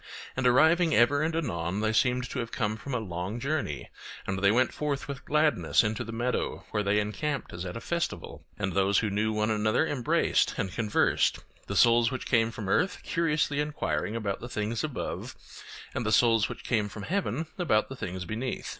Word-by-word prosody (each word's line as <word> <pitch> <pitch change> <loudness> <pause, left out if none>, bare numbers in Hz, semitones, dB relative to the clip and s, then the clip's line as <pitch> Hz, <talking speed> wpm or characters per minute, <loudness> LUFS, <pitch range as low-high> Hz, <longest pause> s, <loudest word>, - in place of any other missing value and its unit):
And 130 -1 +1
arriving 160 +6 +4
ever 125 +5 +4
and 160 +1 0
anon 95 - -2
they 110 0 +1
seemed 125 +3 +2
to 130 - -3
have 115 -1 -4
come 110 -3 -1
from 125 +4 -5
a - - +1
long 95 +2 -4
journey, 140 - -3 0.3
and 95 0 -2
they 100 0 +4
went 125 +4 +3
forth 145 -2 -2
with 140 -2 -6
gladness 150 -3 +3
into 105 0 -1
the 115 - -7
meadow, 115 -5 -2
where 105 - 0
they 105 +1 +2
encamped 135 +7 -3
as 90 +1 -5
at 90 - -5
a - - -4
festival; 170 +4 -3
and 95 -1 -2
those 95 +1 +3
who 110 -2 +1
knew 105 +2 +1
one 105 0 0
another 110 +7 +2
embraced 135 -6 +1
and 95 - -2
conversed, 110 -3 +2 0.3
the 100 - -3
souls 115 +2 +5
which 130 -1 -5
came 115 -2 +3
from 110 -3 -6
earth 180 - +1
curiously 150 -3 0
enquiring 115 - -1
about 105 -4 -2
the 120 - -8
things 110 +1 -2
above, 150 -5 -4 0.6
and - - -2
the 110 - 0
souls 115 -2 +4
which - - -8
came 105 -4 0
from 105 0 -8
heaven 180 - -1
about 110 -12 +2
the 135 - -7
things 90 -6 -5
beneath. 115 +6 -4
115 Hz, 200 wpm, -28 LUFS, 105-140 Hz, 0.6 s, souls